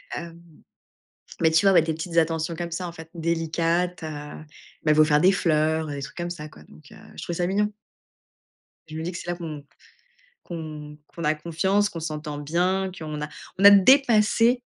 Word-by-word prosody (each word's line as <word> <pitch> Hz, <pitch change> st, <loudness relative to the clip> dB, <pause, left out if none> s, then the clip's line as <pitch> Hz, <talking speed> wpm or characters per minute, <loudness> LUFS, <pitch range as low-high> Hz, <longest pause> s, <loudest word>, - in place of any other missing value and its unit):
Hem, 170 Hz, 0 st, -8 dB, 1.0 s
mais 160 Hz, -, +4 dB
tu 160 Hz, +5 st, +3 dB
vois 195 Hz, -, +6 dB
ouais, 165 Hz, -, +6 dB
des 160 Hz, -1 st, -2 dB
petites 170 Hz, +1 st, -6 dB
attentions 165 Hz, 0 st, +1 dB
comme 170 Hz, 0 st, -4 dB
ça 175 Hz, +1 st, -4 dB
en -, -, -8 dB
fait, 160 Hz, -1 st, -11 dB
délicates, 170 Hz, +1 st, -1 dB
heu, -, -, -3 dB
ils 150 Hz, +1 st, -11 dB
m'avaient 155 Hz, 0 st, +5 dB
offert 150 Hz, -1 st, +4 dB
des 185 Hz, +3 st, +5 dB
fleurs, 160 Hz, -2 st, +1 dB
des 145 Hz, -1 st, -5 dB
trucs -, -, -8 dB
comme 175 Hz, 0 st, -4 dB
ça 155 Hz, -3 st, -7 dB
quoi, -, -, -16 dB
donc 155 Hz, -, -18 dB
heu. -, -, -13 dB, 0.2 s
Je -, -, -8 dB
trouvais 170 Hz, -, -4 dB
ça 175 Hz, -, +1 dB
mignon. 210 Hz, +2 st, 0 dB, 1.2 s
Je 155 Hz, -, -8 dB
me 160 Hz, -, -4 dB
dis 175 Hz, +2 st, -4 dB
que 170 Hz, -, -6 dB
c'est 175 Hz, -, -6 dB
là 175 Hz, -, -2 dB
qu'on 155 Hz, -4 st, -7 dB, 0.8 s
qu'on 155 Hz, -3 st, -8 dB
qu'on 170 Hz, -, -9 dB
a 150 Hz, +1 st, +2 dB
confiance, 190 Hz, +6 st, 0 dB
qu'on 165 Hz, -, -7 dB
s'entend 155 Hz, -2 st, -5 dB
bien, 180 Hz, +5 st, 0 dB
qu'on 155 Hz, -2 st, -6 dB
a 150 Hz, -, -4 dB, 0.3 s
on -, -, +1 dB
a -, -, +13 dB
dépassé, 235 Hz, +2 st, +5 dB
165 Hz, 200 wpm, -24 LUFS, 155-180 Hz, 1.2 s, a